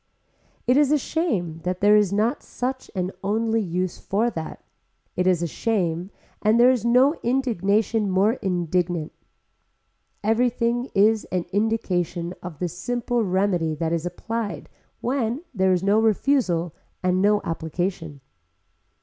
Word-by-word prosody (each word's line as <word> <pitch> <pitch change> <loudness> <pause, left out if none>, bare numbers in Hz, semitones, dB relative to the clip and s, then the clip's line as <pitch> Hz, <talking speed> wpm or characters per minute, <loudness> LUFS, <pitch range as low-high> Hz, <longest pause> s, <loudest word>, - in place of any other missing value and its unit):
It 250 +2 +4
is 290 -1 +4
a 300 - +5
shame 215 - -2
that 180 +1 -2
there 205 +1 +5
is 210 -3 +3
not 215 +4 +1
such 260 +1 -4
an 185 0 -1
only 225 +3 +1
use 180 -1 -2
for 225 +5 0
that, 160 -5 -7 0.5
it 180 +1 +1
is 175 -2 +2
a - - 0
shame 180 -2 -1 0.3
and 215 +2 +3
there 245 +2 +7
is 250 -5 0
no 250 +5 +4
indignation 225 -4 +1
more 195 +4 +3
indignant. 175 -2 -1 1.1
Everything 240 +2 +1
is 215 +2 +4
an 180 -2 -2
indication 185 -5 -1
of 175 -4 -8
the 180 - -2
simple 240 +7 -2
remedy 185 -4 +1
that 165 +1 -1
is 170 +1 -1
applied 220 +4 -4 0.3
when 250 +2 -1
there 190 -3 +2
is 180 0 +1
no 200 +2 +3
refusal 210 - +1 0.3
and 185 0 +2
no 205 +1 +4
application. 165 -2 -3
200 Hz, 140 wpm, -24 LUFS, 175-230 Hz, 1.1 s, there